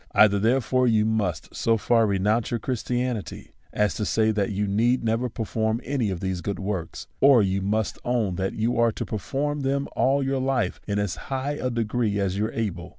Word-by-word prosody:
Either, 100 -2 +5
therefore, 125 +3 +2
you 110 -2 +3
must 100 -8 -2
so 115 0 +2
far 115 +2 +3
renounce 105 +4 +1
your 120 - -1
Christianity 125 -3 -3 0.2
as 105 -1 +1
to 105 - -3
say, 110 +1 +2
that 105 -2 0
you 105 0 -1
need 115 +6 +1
never 115 +2 0
perform 110 0 -1
any 130 -5 -1
of 95 -3 -4
these 95 -2 -2
good 100 +2 -3
works; 95 -4 -4
or 135 -5 +6
you 95 0 0
must 105 +2 -1
own 120 -6 0
that 95 +2 -2
you 115 +2 0
are 115 -1 +4
to - - -5
perform 145 +7 -2
them 140 0 -1
all 140 +1 +2
your 135 0 0
life 130 -2 -1
in 100 -1 -1
as 100 -4 -1
high 135 +1 -1
a 135 -3 -2
degree 115 -2 -1
as 95 -1 0
you 105 +2 0
are - - -9
able. 90 -6 -3
110 Hz, 205 wpm, -25 LUFS, 100-125 Hz, 0.2 s, or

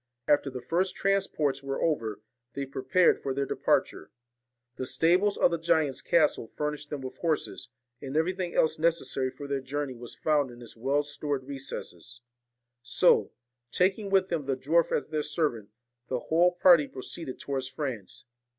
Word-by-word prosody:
After 145 -1 +3
the 130 -2 -7
first 180 +7 0
transports 175 -8 0
were 135 0 -3
over, 115 -10 -1 0.3
they 140 - -2
prepared 170 +7 +2
for 135 -1 -2
their 140 0 0
departure. 80 - 0 0.7
The 130 - -3
stables 185 +5 +2
of - - +4
the 170 - -1
giant's 160 -4 +1
castle 155 -8 +2
furnished 150 0 -3
them 145 -2 -4
with 130 -1 -7
horses; 160 -6 -2 0.3
and 135 +2 -3
everything 180 +2 -1
else 155 - +2
necessary 160 -5 +1
for 140 +2 -9
their 140 -1 -1
journey 140 +1 -3
was 120 -1 -10
found 145 +2 +1
in 120 0 -12
its 120 -2 -11
well 135 +5 +1
stored 145 -1 -3
recesses. 130 - -7 0.6
So, 120 - +3 0.4
taking 195 +5 +1
with 190 -1 +3
them 155 -5 -2
the 135 -2 0
dwarf 160 +5 +2
as 145 - -1
their 155 -1 -1
servant, 145 -9 -1 0.4
the 130 - -1
whole 175 +6 +3
party 175 -4 +6
proceeded 130 +1 -7
towards 135 -2 -3
France. 130 -7 -6
145 Hz, 160 wpm, -28 LUFS, 130-165 Hz, 0.7 s, party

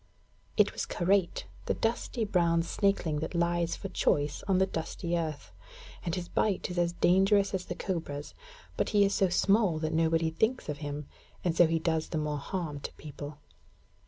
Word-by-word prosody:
It - - +4
was - - -3
Karait, 185 0 +1 0.2
the - - +1
dusty 230 0 -1
brown 170 -4 +2
snakeling 175 -5 +1
that 160 +3 -4
lies 170 0 +1
for 195 - -6
choice 145 -5 0
on 190 -2 +3
the 190 - +4
dusty 170 0 -3
earth; 160 -3 -3 0.5
and 170 -2 -1
his 180 -2 -4
bite 195 -1 0
is 180 - -2
as 170 0 +1
dangerous 195 +3 +3
as 185 -1 -2
the - - -5
cobra's. 160 -6 -4 0.4
But - - +1
he 200 - +7
is 200 - +1
so 190 - +3
small 195 -1 +3
that 155 0 -2
nobody 165 0 +2
thinks 220 +5 0
of 145 -1 -3
him, 145 -1 -5 0.4
and 175 -2 +1
so 175 -1 +6
he 165 +1 +1
does 160 -1 0
the 160 - -2
more 150 -1 -1
harm 155 -1 -4
to - - -6
people. 145 0 -8
170 Hz, 185 wpm, -30 LUFS, 160-190 Hz, 0.5 s, he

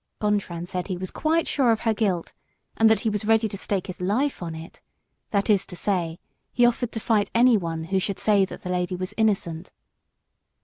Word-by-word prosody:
Gontran 200 -5 -1
said 180 -1 -4
he 185 -3 -3
was 185 0 -6
quite 325 +1 0
sure 260 -5 +3
of 225 - 0
her 225 - +2
guilt, 195 -6 -1 0.4
and 225 0 +5
that 220 - +3
he 225 - +1
was 210 0 -2
ready 220 +1 +3
to 205 - -7
stake 195 -1 -2
his 185 -1 -8
life 230 +10 0
on 165 -2 -5
it, 160 +2 -11 0.5
that 200 -1 0
is 205 -4 +4
to 180 - -9
say, 175 -4 -1 0.3
he 245 - +4
offered 240 0 +1
to 225 - -3
fight 215 -2 +1
anyone 200 -10 +3
who 190 +4 0
should 195 +1 -3
say 205 -2 +3
that - - -10
the 180 - -5
lady 180 0 -1
was 185 +1 -4
innocent. 190 -6 0
200 Hz, 210 wpm, -25 LUFS, 180-225 Hz, 0.5 s, and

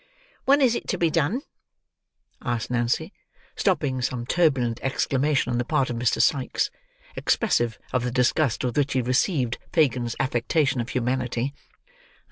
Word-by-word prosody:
"When 280 +2 +5
is 250 -4 +4
it - - -4
to 185 - -1
be 170 -2 +2
done?" 170 - 0 1.0
asked 120 -1 -2
Nancy, 120 -1 0 0.4
stopping 130 -2 0
some 120 -1 -2
turbulent 130 -7 +1
exclamation 135 0 0
on 120 - 0
the - - +1
part 135 -1 0
of - - -3
Mr. 120 0 +1
Sikes, 135 -3 +1 0.4
expressive 120 - +1 0.2
of 125 -2 +1
the 125 - -1
disgust 125 +1 +1
with 125 - -2
which 140 -1 +1
he 130 - +2
received 125 - +1
Fagin's 125 -7 +1
affectation 130 +2 +1
of 120 - -6
humanity. 125 +1 -1
130 Hz, 145 wpm, -25 LUFS, 120-150 Hz, 1.0 s, When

